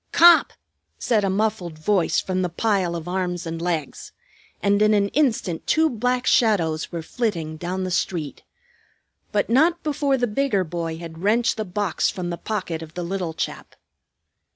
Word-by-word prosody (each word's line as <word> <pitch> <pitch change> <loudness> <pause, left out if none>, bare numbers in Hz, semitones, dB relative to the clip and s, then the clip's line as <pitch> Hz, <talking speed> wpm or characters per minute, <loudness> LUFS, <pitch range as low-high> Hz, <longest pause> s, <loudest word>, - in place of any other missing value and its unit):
"Cop!" 340 -1 +6 0.4
said 220 -4 +1
a 195 - +1
muffled 190 -5 -1
voice 180 +2 +1
from 185 -1 -2
the 180 - 0
pile 185 -1 0
of 165 0 -6
arms 180 -1 -2
and 165 0 -5
legs, 165 -5 -3 0.5
and 200 0 +2
in 215 0 +5
an 200 -1 +2
instant 225 - 0
two 320 0 +3
black 250 +2 -1
shadows 170 -9 +2
were 170 -2 -4
flitting 165 -7 -2
down 180 +3 -3
the 185 - -3
street; 165 -4 -2 0.9
but 205 -1 +1
not 320 +9 +3
before 285 -2 +1
the 245 - +1
bigger 215 -3 0
boy 165 -1 -4
had 165 -1 -9
wrenched 230 +4 +2
the 215 - -3
box 190 -2 0
from 175 -2 -4
the 170 - -4
pocket 185 -7 -3
of 160 0 -10
the 175 - -3
little 175 -2 -3
chap. - - -5
190 Hz, 170 wpm, -23 LUFS, 170-220 Hz, 0.9 s, Cop